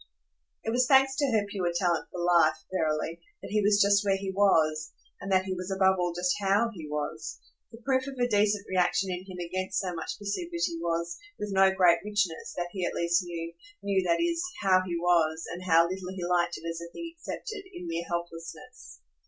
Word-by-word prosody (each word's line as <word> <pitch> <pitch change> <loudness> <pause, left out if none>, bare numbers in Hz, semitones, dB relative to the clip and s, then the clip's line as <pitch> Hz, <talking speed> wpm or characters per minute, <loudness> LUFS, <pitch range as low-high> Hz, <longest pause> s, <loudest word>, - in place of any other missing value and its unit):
It 225 - -1
was 250 +1 +2
thanks 270 -1 +5
to 285 - +2
her 215 -4 +2
pure 190 -4 -1
talent 175 -2 +1
for 180 - -7
life, 170 -3 +4 0.2
verily, 160 -1 -1 0.2
that - - -7
he 210 0 +2
was 205 0 +4
just 200 0 +5
where 195 -1 +2
he 195 0 -4
was 155 -6 +2 0.3
and 195 +1 -6
that 190 0 +3
he 190 - -2
was 185 +1 -5
above 190 0 +3
all 175 -1 +1
just 180 +1 0
HOW 205 +4 +2
he 165 -6 -8
was. 150 +1 -4 0.3
The 230 - -11
proof 260 -1 +1
of 275 -1 -7
a 245 0 +2
decent 205 -2 +2
reaction 185 +1 +1
in 180 +1 -5
him 185 -1 -8
against 185 +2 -3
so 185 -2 -3
much 165 - -5
passivity 215 - -2
was, 170 0 -2 0.2
with 210 -1 -4
no 190 0 +6
great 180 -3 +4
richness, 205 -5 -1
that 175 0 -2
he 190 -1 -4
at - - -1
least 170 +2 +2
knew 170 -1 -6 0.3
knew, 195 -1 +2
that 170 - +2
is, 335 0 0 0.2
how 185 -1 +5
he 175 -2 -3
was, 165 -2 +2
and 175 - -7
how 165 -2 +6
little 185 0 -5
he 180 -2 -4
liked 175 -1 +1
it 165 - -8
as 165 0 -4
a 170 0 -8
thing 335 -1 -7
accepted 405 +5 -6
in 350 - -8
mere 170 +1 -3
helplessness. 165 - -7
185 Hz, 210 wpm, -28 LUFS, 170-205 Hz, 0.3 s, no